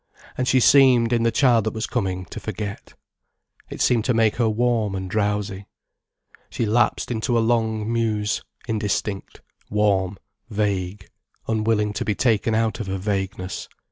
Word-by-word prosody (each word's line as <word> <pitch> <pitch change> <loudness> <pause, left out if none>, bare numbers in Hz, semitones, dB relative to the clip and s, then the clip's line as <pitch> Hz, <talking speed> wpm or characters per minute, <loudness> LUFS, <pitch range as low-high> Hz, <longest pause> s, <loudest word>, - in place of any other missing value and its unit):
And 130 - -1
she 130 - +4
seemed, 125 -3 +5
in 120 - +2
the 115 0 +2
child 120 -2 +3
that 110 - -2
was 110 - -2
coming, 95 -1 -2
to - - -6
forget. 105 -1 -6 0.7
It - - -6
seemed 120 -3 +3
to 125 - +1
make 110 -1 +2
her 115 -2 +2
warm 110 -2 0
and 95 0 -4
drowsy. 100 -1 -2 0.8
She 115 - -2
lapsed 120 +3 +1
into 120 +1 0
a - - +4
long 110 -1 0
muse, 110 -2 0 0.3
indistinct, 105 -2 -3 0.3
warm, 100 -2 +1 0.3
vague, 100 -3 -2 0.4
unwilling 110 -1 +1
to 105 - -2
be 105 - -1
taken 115 -2 +1
out 115 0 0
of 110 - -4
her 95 0 -2
vagueness. 95 -1 -3
110 Hz, 155 wpm, -23 LUFS, 100-115 Hz, 0.8 s, seemed